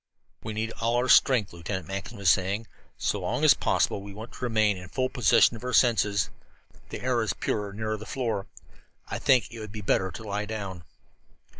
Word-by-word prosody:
"We 110 - -5
need 110 +1 -2
all 115 +1 +1
our 125 +1 +1
strength," 125 -7 +5
Lieutenant 90 +3 -5
Mackinson 100 +3 -6
was 100 -3 +4
saying. 95 +5 0 0.3
"So - - -1
long - - -2
as - - +8
possible - - 0
we 100 0 -10
want 110 +3 -9
to - - -10
remain 110 -4 +2
in 90 -1 -10
full 130 +3 -1
possession 120 -1 +4
of 115 - -10
our 125 0 -3
senses. 105 -5 +3 0.6
The - - -6
air 125 -2 +1
is 110 - 0
purer 105 -2 -2
near 110 +1 -3
the 110 +2 -10
floor. 115 -7 -2 0.6
I - - -3
think 130 -4 +3
it 115 - -8
would 110 -2 -7
be 105 0 -6
better 95 -1 +1
to 95 +6 -9
lie 105 0 -3
down." 95 -6 -6
110 Hz, 200 wpm, -27 LUFS, 100-115 Hz, 0.6 s, as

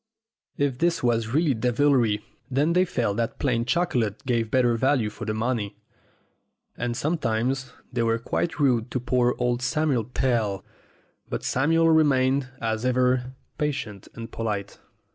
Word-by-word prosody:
If 140 -3 0
this 170 -3 +1
was 115 -2 +2
really 145 +5 +2
devilry, 120 -2 +2 0.2
then 145 +5 +2
they 180 +1 +4
felt 115 - -1
that 115 +2 -1
plain 120 -5 0
chocolate 125 - 0
gave 115 -3 0
better 120 -1 +3
value 125 -3 +1
for 105 - -7
the 110 - -1
money. 110 -2 -2 1.0
And 120 0 -3
sometimes 130 -3 -1 0.2
they 120 - 0
were 115 0 +2
quite 165 +8 -2
rude 125 -5 +2
to 125 - -2
poor 125 0 +1
old 125 0 0
Samuel 130 -2 +1
Pell. 115 -6 -1 0.6
But - - -3
Samuel 165 +5 +3
remained, 135 -4 +3
as 110 0 -2
ever, 125 0 +1 0.2
patient 135 -10 -3
and 115 0 -8
polite. 105 -3 -4
125 Hz, 145 wpm, -25 LUFS, 115-140 Hz, 1.0 s, they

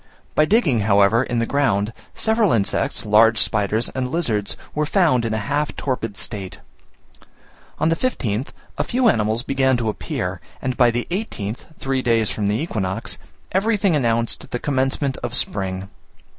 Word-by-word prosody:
By 155 - +4
digging, 165 - +3
however, 100 +2 +4
in 120 -2 -2
the 115 - +1
ground, 115 -6 +1 0.2
several 220 -3 +2
insects, 100 -4 0
large 110 +2 +5
spiders, 110 +2 +1
and 130 -1 -3
lizards 115 -10 -1 0.2
were 150 0 0
found 155 - +3
in 110 - -1
a 110 - -3
half 145 +1 -1
torpid 115 -6 -3
state. 100 -5 -3 1.2
On 160 - +2
the 165 - +2
15th, 130 - -1 0.3
a - - +3
few 250 0 +1
animals 110 - +2
began 135 -2 +2
to 115 -2 -1
appear, 105 - -4 0.2
and 130 -1 -2
by 120 -2 +5
the 120 +1 -1
18th 125 - -4
(three 135 -1 -1
days 115 -3 +2
from 105 -2 -1
the 105 +2 +1
equinox), 110 - -2 0.3
everything 195 -2 +2
announced 115 -4 0
the - - -2
commencement 135 +1 0
of 120 -1 -3
spring. 95 -1 -1
120 Hz, 155 wpm, -21 LUFS, 105-145 Hz, 1.2 s, large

